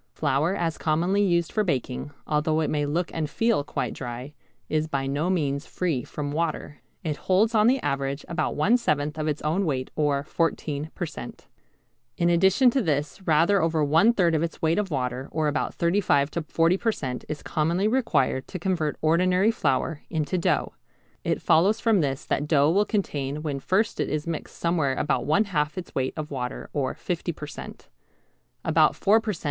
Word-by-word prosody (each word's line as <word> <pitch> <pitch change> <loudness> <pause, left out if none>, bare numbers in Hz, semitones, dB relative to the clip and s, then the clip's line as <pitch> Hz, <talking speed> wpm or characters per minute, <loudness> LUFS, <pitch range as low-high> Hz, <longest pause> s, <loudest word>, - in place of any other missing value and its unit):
Flour 155 +8 +1
as 165 -4 -2
commonly 175 +6 +1
used 170 -4 +2
for 215 - +1
baking, 135 -6 -2 0.2
although 155 +1 +1
it 155 - -1
may 145 -1 0
look 170 +4 -1
and 155 -2 -2
feel 225 -6 +1
quite - - -3
dry, 125 +3 -7 0.3
is 155 0 0
by 135 -3 -2
no 145 +6 -1
means 145 -5 -1
free 160 -9 -1
from 145 +2 -5
water. 155 -2 -3 0.2
It 155 -4 -2
holds 200 +8 +2
on 215 0 +4
the 265 +2 +4
average 140 +1 -2
about 165 -2 -1
one 210 +11 +4
seventh 150 -8 -1
of 155 - -1
its 150 -1 -2
own 160 +6 +1
weight 130 -6 -2
or 145 -2 +1
14 155 -2 -2
per 175 - -2
cent. 155 - -9 0.7
In 170 0 +2
addition 190 +9 +4
to 265 - +1
this 150 -1 -1
rather 170 +5 +4
over 160 -1 +1
one 165 +10 +5
third 180 -7 +2
of 155 - +2
its 170 0 -3
weight 165 +4 +2
of 205 -2 -1
water 130 -2 -2
or 155 0 0
about 145 - -1
35 170 -5 +2
to 170 - -2
40 165 +3 +2
per 225 +2 +1
cent. 130 - -5
is 150 - -5
commonly 170 +6 0
required 215 - +1
to 185 - -6
convert 170 -4 -1
ordinary 180 +6 +3
flour 150 - -1
into 155 +1 -1
dough. 175 - 0 0.5
It - - -1
follows 195 +8 +4
from 220 -5 +3
this 135 -2 -2
that 145 - -1
dough 150 -1 +4
will 200 +4 +3
contain 150 - -2
when 145 -3 -2
first 200 +9 0
it - - 0
is 150 0 -2
mixed 165 -2 -5
somewhere 160 -6 +1
about 145 0 0
one 200 +8 +4
half 150 -6 -1
its 180 - -6
weight 130 0 -1
of 155 -1 -5
water 125 -2 -5
or 135 -3 -1
50 175 -1 -3
per 150 - -7
cent. 145 - -10 0.8
About 160 -1 +4
four 215 +3 +3
per 220 -1 -2
cent. 165 - -9
160 Hz, 195 wpm, -25 LUFS, 145-185 Hz, 0.8 s, one